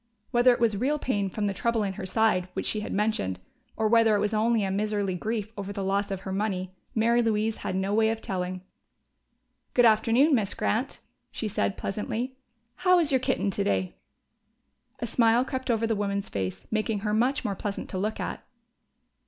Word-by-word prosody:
Whether 245 0 +5
it 245 - +1
was 230 -3 +2
real 270 +9 +1
pain 205 -9 -1
from 210 +2 -2
that 200 -1 -1
trouble 235 -2 +1
in 195 -1 -2
her 190 -1 -6
side 190 -4 +2
which - - -3
she 215 - 0
had 210 - -5
mentioned, 200 - 0 0.4
or 220 - +2
whether 225 -1 +5
it - - +2
was 210 +2 0
only 220 0 +2
a 190 - -1
miserly 205 -1 0
grief 215 +3 -3
over 200 0 -5
the 200 -1 -4
loss 200 +1 0
of 195 -1 -4
her 190 - -5
money, 190 -2 -2 0.2
Mary 235 +2 +3
Louise 220 -1 0
had 185 - -4
no 190 +1 0
way 220 +1 +4
of 225 0 -1
telling. 185 -2 -3 1.1
"Good 245 - +6
afternoon, 230 +7 +4
Miss 210 -6 +1
Grant," 245 +6 -1 0.3
she 220 - -4
said 200 -1 -1
pleasantly. 225 +6 -3 0.4
"How 365 0 +4
is 320 -4 +2
your 265 - +4
kitten 255 -6 0
today?" 95 - -1 1.0
A 235 - -3
smile 230 +1 +3
crept 260 0 -4
over 225 -1 +2
the 225 0 +1
woman's 200 -1 -2
face, 95 -1 -4
making 215 -1 0
her 210 0 -1
much 255 +6 +1
more 200 - 0
pleasant 200 +1 -4
to 185 - -3
look 215 +3 -2
at. - - -4
215 Hz, 195 wpm, -27 LUFS, 195-230 Hz, 1.1 s, Good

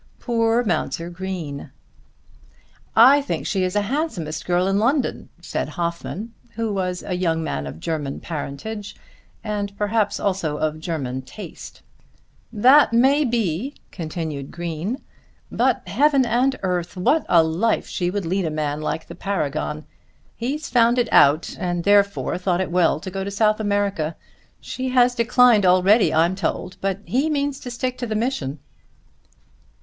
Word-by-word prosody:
Poor 230 0 +1
Mounser 175 -3 -2
Green! 175 -6 -5 1.3
"I 265 +6 +7
think 280 - -3
she's 185 -2 0
the 205 - +1
handsomest 205 - -3
girl 180 0 +2
in 195 +1 +2
London," 265 +5 0
said - - -3
Hoffmann, 175 +6 -4 0.2
who 225 -2 -2
was 180 -2 -2
a 185 - -4
young 165 -3 0
man 70 - -3
of 75 +3 -8
German 150 - -3
parentage 170 +7 -6 0.5
and 205 -2 -3
perhaps 210 0 0
of 155 -5 -1
German 140 -6 -3
taste. 130 +11 -11 0.7
"That 250 +5 +5
may 270 +5 +4
be," 230 - -1 0.2
continued 155 -5 -5
Green; 175 - -4 0.5
"but, - - +1
heaven 280 -2 +3
and 250 +3 +2
earth! 180 -1 -2
what 295 - +2
a 170 -2 +6
life 170 +8 0
she 175 -1 -2
would 200 0 -3
lead 185 +2 0
a - - 0
man 150 -1 -2
like 160 +1 -3
the - - -10
Paragon! 155 -5 -3 0.5
He's 285 +7 -3
found 240 0 +3
it 240 -2 0
out, 145 +3 +4
and 175 -3 -2
therefore 200 -2 +2
thought 180 -1 0
it 185 -2 -2
well 175 -3 +3
to 185 - -7
go 195 +1 -3
to 200 - -4
South 215 +1 +2
America. 200 -6 -1 0.4
She 260 0 -4
has 250 -1 +4
declined 240 -2 +4
already, 185 +4 +5
I'm 165 +3 +3
told; 185 -1 -3
but 195 0 -1
he 275 +6 +1
means 285 -2 -1
to 250 - -7
stick 250 +1 -3
to 245 - -3
the 215 - -2
mission." 210 - -2
195 Hz, 150 wpm, -22 LUFS, 165-235 Hz, 1.3 s, I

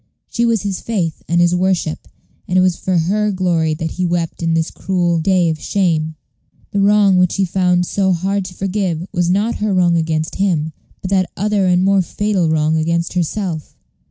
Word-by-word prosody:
She 235 - +1
was 225 -3 +1
his 195 -2 -3
faith 180 -9 -2
and 170 +1 +1
his 175 0 +3
worship, 180 -3 -1 0.4
and 180 - 0
it - - +5
was 185 -2 +2
for 185 0 -1
her 205 +6 +1
glory 170 -4 0
that 160 0 -4
he 185 - -2
wept 170 -1 -2
in 165 -1 +1
this 165 0 0
cruel 175 -3 0
day 180 +1 +2
of 155 - -5
shame. 160 -5 0 0.6
The 200 - -1
wrong 200 -1 +4
which 180 -1 +2
he 195 - +1
found 180 -1 +1
so 190 +1 0
hard 190 +3 0
to 180 - -9
forgive 185 -4 -2
was 175 0 +1
not 205 +5 +1
her 210 -2 -1
wrong 175 -2 +3
against 160 -1 -2
him, 160 -6 0 0.3
but 190 - -5
that 190 -2 +2
other 205 -1 +1
and 180 0 +3
more 195 0 +3
fatal 190 -2 -1
wrong 155 0 +1
against 170 +1 -1
herself. 175 -2 -3
180 Hz, 195 wpm, -17 LUFS, 165-195 Hz, 0.6 s, it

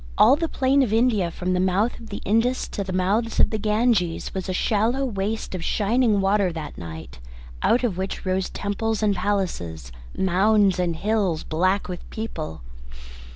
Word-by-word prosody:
All 260 - +7
the 330 +2 -2
plain 270 +1 +2
of 250 -6 +1
India 220 -5 +2
from 180 +2 -3
the 180 - +1
mouth 190 +5 +1
of 230 - -12
the 205 - -6
Indus 230 +5 +1
to 200 - -3
the 190 - -6
mouths 200 +5 0
of - - +4
the 220 - -1
Ganges 210 -5 +1
was 190 0 -4
a - - +1
shallow 225 +8 +1
waste 215 -2 -3
of 180 -3 -4
shining 215 +2 +2
water 195 -1 +2
that 160 -3 -7
night, 80 -7 -9 0.4
out 245 - +3
of 195 -7 -1
which 190 +1 -4
rose 185 0 0
temples 215 +2 -2
and 205 -2 +2
palaces, 90 - -2 0.3
mounds 195 +1 +3
and 175 -2 0
hills, 200 -3 0
black 185 +5 0
with 180 -1 -7
people. 155 - -6
200 Hz, 175 wpm, -23 LUFS, 180-225 Hz, 0.4 s, All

